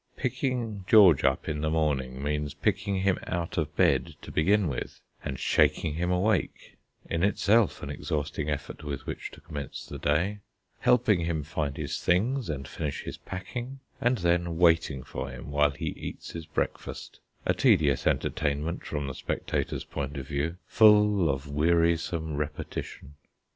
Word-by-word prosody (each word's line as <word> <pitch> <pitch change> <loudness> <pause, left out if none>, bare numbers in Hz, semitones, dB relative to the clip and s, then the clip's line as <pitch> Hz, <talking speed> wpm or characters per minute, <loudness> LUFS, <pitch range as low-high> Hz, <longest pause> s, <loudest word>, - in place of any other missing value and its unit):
Picking 125 -5 -2
George 95 -10 +7
up 65 -1 +1
in 75 -1 -2
the 80 - 0
morning 70 -5 0
means 75 0 -2
picking 100 -2 0
him 95 -1 +2
out 85 -1 -2
of 75 - -3
bed - - +2
to - - -8
begin 100 +4 +3
with, 65 -5 -4 0.2
and 65 - -4
shaking 75 +3 +2
him 85 +3 -1
awake 90 +2 0 0.3
in 85 - -1
itself 105 +2 +3
an - - -4
exhausting 75 0 -3
effort 75 0 -4
with 70 -2 -5
which - - -5
to - - -14
commence 75 -4 -6
the - - -8
day; 85 +8 +1 0.4
helping 105 -8 +3
him 80 -3 -1
find 75 -1 -3
his - - -3
things 115 +6 +1
and 70 -3 -4
finish 75 -1 -4
his - - -6
packing; 120 +8 -6 0.2
and 120 +1 +3
then 85 -2 +1
waiting 80 -6 +3
for - - -5
him - - -8
while 75 0 +4
he 70 - -4
eats - - -7
his 80 -1 -7
breakfast, - - -4 0.3
a - - +3
tedious 70 -5 +3
entertainment 75 +3 0
from 75 -2 -3
the 70 - -4
spectator's - - -2
point 70 +1 -5
of 65 -1 -6
view, 75 +4 -1
full 105 -4 +5
of 70 +1 -2
wearisome 85 +1 +1
repetition. 75 -1 -5
80 Hz, 160 wpm, -28 LUFS, 75-95 Hz, 0.4 s, George